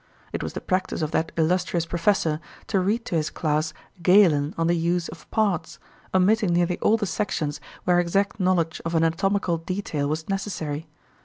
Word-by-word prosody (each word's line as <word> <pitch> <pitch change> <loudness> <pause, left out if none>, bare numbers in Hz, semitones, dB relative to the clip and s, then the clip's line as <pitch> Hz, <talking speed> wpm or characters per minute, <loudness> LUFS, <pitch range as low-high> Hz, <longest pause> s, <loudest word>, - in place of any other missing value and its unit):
It - - -2
was - - -4
the - - -5
practice 185 -3 -1
of 155 - -2
that 160 -1 0
illustrious 170 +1 +1
professor 170 -3 +1 0.3
to 200 - +1
read 215 +6 0
to - - -5
his 155 -1 +1
class 155 0 0 0.3
Galen 170 -5 +5
on 165 - +1
the 170 - +3
"Use 170 +1 0
of 165 -2 -12
Parts," 205 -7 0 0.3
omitting 190 0 +3
nearly 175 +1 +1
all 220 - +3
the 210 - -1
sections 165 -6 -2 0.2
where 180 -1 +3
exact 195 +5 0
knowledge 180 -3 +1
of 165 0 -2
anatomical 170 +2 +1
detail 165 -5 -2
was 155 +1 -3
necessary. 165 -6 -3
175 Hz, 170 wpm, -25 LUFS, 160-195 Hz, 0.3 s, Galen